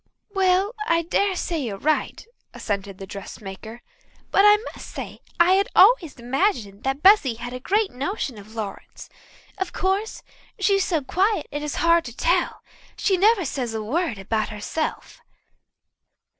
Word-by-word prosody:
"Well, 385 +2 +2
I 335 0 +2
dare 385 +3 +1
say 345 -2 -2
you're 220 -7 -4
right," 305 - -1 0.3
assented 200 -2 -4
the 195 - -8
dressmaker. 200 +3 -9 0.5
"But 395 - +5
I 415 0 +8 0.2
must - - -10
say - - -7 0.2
I 340 +2 +6
had 390 +1 +3
always 375 - +5
imagined 240 - -1
that 270 +2 -2
Bessy 375 - +6
had 240 +2 -7
a 250 - -5
great 405 - +1
notion 270 - -4
of 215 +2 -14
Lawrence. 210 -3 -7 0.5
Of 380 -2 -3
course, 390 +4 -1 0.3
she's 395 -1 +2
so 325 -7 0
quiet 380 +4 +1
it 290 - -4
is 300 -1 -4
hard 335 0 +5
to 240 +1 -9
tell. 350 +1 0 0.3
She 390 - +2
never 400 0 +3
says 250 -5 -3
a 220 - -3
word 280 - -1
about 215 +3 -2
herself." 215 +9 -4
310 Hz, 155 wpm, -23 LUFS, 225-380 Hz, 0.5 s, I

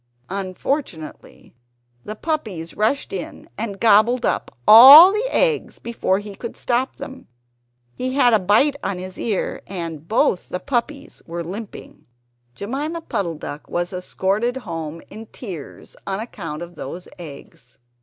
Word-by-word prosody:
Unfortunately 190 - -5 0.5
the 215 - -6
puppies 215 - -4
rushed 220 +5 0
in 185 -3 -7
and 205 -3 -5
gobbled 230 +3 +4
up - - -1 0.2
all 275 - +11
the 430 +4 -1
eggs - - 0
before 230 -5 -1
he 205 0 -7
could 230 +4 -8
stop 250 +2 -1
them. 275 -2 -10 0.7
He 255 - -3
had 245 -4 +4
a 220 - +5
bite 215 +10 +3
on 195 - -2
his 185 +1 -8
ear, 210 -5 -2
and 165 -5 -6
both 200 -3 +1
the 180 - -3
puppies 275 +4 -3
were 170 0 -5
limping. 200 +5 -9 0.5
Jemima 290 +10 -4
Puddle 175 - -3
duck 150 -1 -8
was 175 +1 -2
escorted 195 +6 -1
home 165 -1 -6
in 220 +2 -10
tears 185 - -9
on 195 0 -2
account 170 -8 -6
of 175 0 -10
those 175 +2 -8
eggs. 140 -5 -12
205 Hz, 140 wpm, -21 LUFS, 175-250 Hz, 0.7 s, all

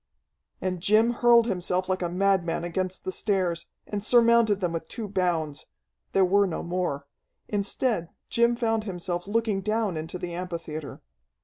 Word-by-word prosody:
And 185 -2 -2
Jim 215 +5 +4
hurled 235 -1 +5
himself 185 -3 -1
like 185 0 -1
a 175 - -1
madman 180 -2 +1
against 185 +1 -3
the 185 - -3
stairs, 185 -4 -1 0.2
and 205 -1 -4
surmounted 235 -3 +4
them 175 -3 -1
with 165 -1 -4
two 225 -3 -5
bounds. 175 -7 -1 0.5
There 190 -1 +5
were 200 +2 +4
no 170 - -4
more. 170 -5 -2 0.4
Instead, 205 -2 -1 0.2
Jim 235 0 +3
found 225 -2 0
himself 175 -2 -4
looking 215 -2 0
down 215 -3 0
into 160 +3 -5
the 175 -1 -5
amphitheatre. 165 -4 -6
185 Hz, 150 wpm, -26 LUFS, 175-215 Hz, 0.5 s, hurled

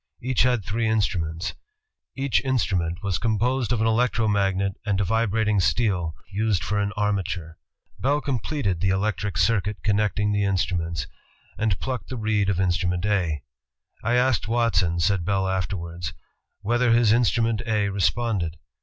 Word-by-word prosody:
Each 130 +1 0
had 125 -6 +2
three 110 +3 -1
in 110 0 +2
struments. 85 -3 -1 0.6
Each 135 -1 +1
instrument 95 -9 0
was 100 -3 -1
composed 120 +2 0
of 120 -3 +1
an - - +2
electro 115 0 +2
magnet 100 -1 +1
and 100 -2 0
a - - +2
vibrating 110 0 +1
steel 90 -6 +1 0.2
used 105 -2 0
for 105 0 -1
an 100 0 0
armature. 95 -5 -2 0.4
Bell 140 +4 +2
completed 130 - -2
the 95 - +2
electric 100 0 -1
circuit 105 0 +1
connecting 105 0 +1
the 105 0 +1
in 100 -1 +1
struments, 85 -5 -1 0.5
and 110 -3 0
plucked 130 -2 -4
the 130 - -4
reed 105 -2 +1
of 100 - +1
instnmient 90 0 0
A. 90 -8 0 0.6
"I 115 +2 +1
asked 125 -2 +2
Watson,'' 110 -7 +1
said 95 +1 +2
Bell 95 +1 0
afterwards, 90 -3 -3 0.5
"whether 120 +2 +2
his 115 -2 +4
in 120 +2 +5
strument 115 -2 +1
A 105 -2 +1
responded. 100 -4 0
105 Hz, 155 wpm, -24 LUFS, 95-115 Hz, 0.6 s, in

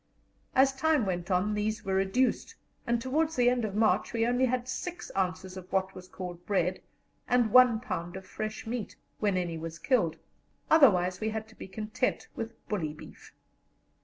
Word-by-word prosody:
As 270 +1 +5
time 305 -4 +2
went 175 -2 -3
on 190 +3 +1
these 215 +1 -2
were 190 - -1
reduced, 195 +7 +1 0.3
and 235 0 +2
towards 305 +6 0
the 245 -1 +4
end 250 -1 0
of 205 -2 -3
March 220 +2 +2
we 230 -1 +2
only 245 +2 +2
had 250 0 -1
6 350 +7 -5
ounces 185 0 -2
of 185 0 -10
what 190 0 0
was 185 0 -10
called 180 -2 -7
bread 185 -2 0 0.5
and 245 -3 +3
1 250 -3 +7
pound 175 -7 -4
of 190 0 -8
fresh 215 +3 -5
meat, 225 -1 -4 0.2
when 205 -3 +1
any 170 -3 -2
was 165 0 -6
killed; 170 - +1 0.6
otherwise 185 - +5
we 220 - 0
had 220 0 -4
to 220 - -17
be - - -9
content 215 +5 -2
with 225 0 -7
bully 165 -8 -2
beef. 155 - -13
215 Hz, 180 wpm, -29 LUFS, 185-245 Hz, 0.6 s, 1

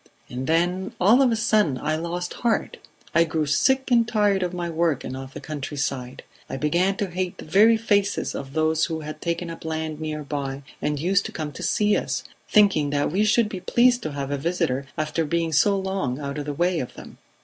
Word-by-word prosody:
And 125 +1 -4
then 175 +3 +1
all 220 +9 +5
of 260 -3 +4
a - - +2
sudden 215 - +2
I 155 +4 -1
lost 170 +2 -3
heart; 235 -2 0 0.4
I 170 - +5
grew 160 -2 -1
sick 265 - +2
and 235 -2 +4
tired 205 -4 +2
of 180 -1 -1
my 175 -1 -3
work 165 -4 0
and 130 - -5
of 135 0 -8
the - - -5
countryside; 140 -4 -4 0.3
I - - -4
began 175 +7 +1
to 200 -3 -2
hate 185 0 -3
the - - -9
very 210 +8 +5
faces 205 -3 +1
of 135 0 -6
those 160 +1 +2
who 160 -2 -4
had 155 0 -7
taken 170 0 -2
up 165 - -9
land 160 -1 -3
near 155 -1 -3
by 140 -1 -4 0.2
and 150 -1 -1
used 195 +5 +1
to - - -9
come 155 -2 -4
to - - -9
see 210 0 +2
us, - - -2 0.3
thinking 195 -9 +4
that 145 0 0
we 195 +5 +2
should 215 +1 +3
be 200 -3 -6
pleased 240 +6 +3
to 155 - -4
have 140 -1 -4
a 140 - -1
visitor 140 -4 -1
after 155 +1 -1
being 165 +1 -1
so 200 +7 +4
long 190 -9 -2
out 140 0 -4
of 145 - -4
the 145 - -2
way 175 +3 +1
of 125 - -5
them. - - -12
165 Hz, 220 wpm, -24 LUFS, 150-195 Hz, 0.4 s, all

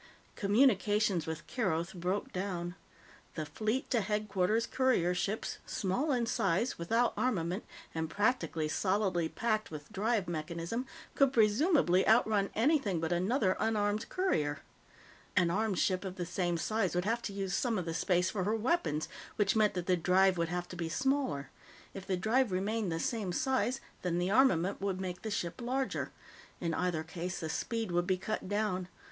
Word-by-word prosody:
Communications 205 - +3
with 160 0 -5
Keroth 185 -8 -1
broke 185 +3 -2
down. 180 -2 -3 0.6
The 155 - -3
Fleet 215 - -2
to 235 -4 +3
Headquarters 210 +1 0
courier 250 -10 +2
ships, 200 +4 -2
small 235 +10 0
in 245 -3 +1
size, 225 0 0
without 230 +8 +2
armament, 185 -6 -1 0.3
and 160 -1 -2
practically 205 -6 0
solidly 185 -1 +1
packed 215 -2 -1
with 150 -2 -9
drive 210 -1 0
mechanism, 170 +9 -3 0.3
could 275 -2 +4
presumably 220 - +4
outrun 215 -2 +4
anything 225 - +2
but 160 +1 -2
another 190 +3 +2
unarmed 210 -1 0
courier. 150 - 0 0.7
An 175 -2 +3
armed 210 0 0
ship 185 +1 +1
of 190 -1 -5
the 180 -2 -3
same 175 0 -1
size 200 +1 0
would 180 +1 0
have 230 +3 0
to 205 - -4
use 195 -2 -3
some 225 +3 +1
of 180 - -2
the 165 - -3
space 180 +2 +1
for 190 -3 -1
her 210 +4 +1
weapons, 215 - 0 0.3
which 205 -1 +2
meant 210 -2 +3
that 180 -1 -2
the 185 - +3
drive 185 +2 +4
would 170 -1 -1
have 175 0 -3
to - - -7
be 170 -2 -3
smaller; 260 - 0 0.4
if 195 -1 -8
the 190 -2 0
drive 225 +5 +2
remained 200 +1 -1
the 165 - -1
same 210 -1 -1
size, 260 +4 0 0.2
then 175 -2 -1
the 180 +2 0
armament 200 -7 +3
would 195 -2 -1
make 180 -1 -4
the 220 - -4
ship 180 +1 -3
larger. 260 +2 -1 0.5
In 170 -1 -1
either 175 -2 0
case, 175 +2 -5
the 160 - -4
speed 225 +4 -2
would 175 0 +1
be 185 -1 +2
cut 190 0 -4
down. 205 -3 0
195 Hz, 170 wpm, -32 LUFS, 175-225 Hz, 0.7 s, could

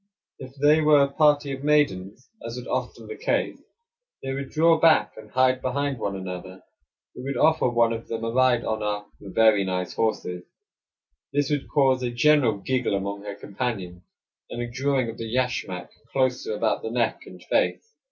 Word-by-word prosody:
If 130 0 -10
they 145 +3 +4
were 150 -2 +5
a 140 - -1
party 145 -1 +3
of 135 0 -6
maidens, 130 -7 +1 0.2
as 115 0 -6
was 125 - -7
often - - -4
the 435 - -7
case, - - -1 0.6
they 135 0 -3
would 135 0 -5
draw 165 +1 +3
back 160 -1 +4
and 110 -1 -12
hide 130 +2 +2
behind 140 0 -2
one 100 -2 -2
another. 95 0 -7 0.5
We - - -8
would 135 0 -4
offer 160 -2 +3
one 120 -1 +2
of 115 0 -6
them 115 0 -4
a 115 - -1
ride 125 -1 +3
on 110 0 -2
our 105 0 -2
"very 105 +1 +3
nice 90 -1 -3
horses." 90 -5 -2 0.9
This 145 0 0
would 145 -2 -2
cause 135 -3 +3
a 125 - -1
general 120 -2 +3
giggle 125 +1 -1
among 100 +1 -3
her 100 -1 -5
companions, 100 -4 -5 0.5
and 120 - -6
a 120 - -2
drawing 130 0 0
of 115 - -7
the 115 -1 -5
yashmak 115 -8 -2 0.2
closer 130 -4 0
about 110 +1 0
the 110 - -4
neck 115 -1 -1
and - - -12
face. 455 - -1
125 Hz, 180 wpm, -25 LUFS, 105-140 Hz, 0.9 s, were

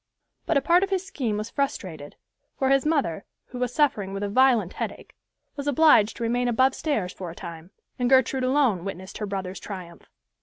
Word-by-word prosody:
But 330 - +3
a - - +3
part 345 +5 +4
of 390 - 0
his 385 -1 -1
scheme 255 - -2
was 215 +2 -5
frustrated, 185 - -4 0.4
for 265 -1 +1
his 275 +2 +3
mother, 275 - 0 0.2
who 250 - -9
was 250 -1 -1
suffering 220 -9 +1
with 195 +1 -4
a 205 - -1
violent 235 -5 +3
headache, - - -6 0.4
was 280 0 -5
obliged 285 -7 +5
to 235 - -4
remain 245 +2 0
above 260 +3 +3
stairs 220 - -2
for 180 -2 -7
a 165 - -9
time, 170 0 -9 0.3
and 245 0 +1
Gertrude 260 0 +3
alone 255 -9 +2
witnessed 190 0 -7
her 210 - -3
brother's 190 -1 -4
triumph. 180 -4 -9
240 Hz, 195 wpm, -25 LUFS, 195-275 Hz, 0.4 s, obliged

